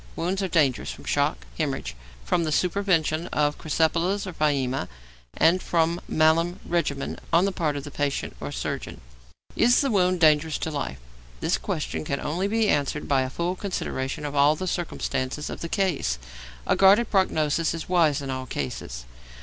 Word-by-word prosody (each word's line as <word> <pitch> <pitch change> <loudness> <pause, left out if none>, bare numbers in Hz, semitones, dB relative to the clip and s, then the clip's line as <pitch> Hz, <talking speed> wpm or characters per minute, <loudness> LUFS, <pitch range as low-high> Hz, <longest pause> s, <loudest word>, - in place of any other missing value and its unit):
Wounds 185 +4 -1
are 190 - 0
dangerous 150 -7 +1
from - - -8
shock, 60 0 0
hæmorrhage, - - -2 0.3
from 170 - +1
the 160 - -1
supervention 170 -2 +1
of 145 0 +1
crysipelas 165 +5 +1
or 185 - -6
pyæmia, 140 -4 0 0.5
and 180 +3 +4
from 170 0 +1
malum 165 +4 +2
regimen 155 -5 -1
on 170 +3 +5
the 200 - +1
part 155 -5 -1
of 140 - -4
the 145 - -8
patient 145 -1 -2
or - - -5
surgeon. - - -4 0.6
Is 245 +1 +4
the 275 -2 0
wound 185 -3 +2
dangerous 155 -1 +4
to 160 - -3
life? 140 - -3 0.4
This - - 0
question 80 -1 -3
can 140 - -2
only 175 +6 -1
be 220 +1 +1
answered 145 -3 0
by 135 -2 +3
a 130 - -2
full 170 +6 -2
consideration 150 -8 -3
of 145 - -4
all 145 +1 +4
the 185 - -4
circumstances 150 -5 -2
of - - -7
the 170 - -4
case; 170 - 0 0.5
a - - +2
guarded 200 +4 +5
prognosis 165 -4 +1
is 165 - -6
wise 155 -5 +2
in 135 - -4
all 130 0 -4
cases. 60 - -5
160 Hz, 175 wpm, -25 LUFS, 140-180 Hz, 0.6 s, on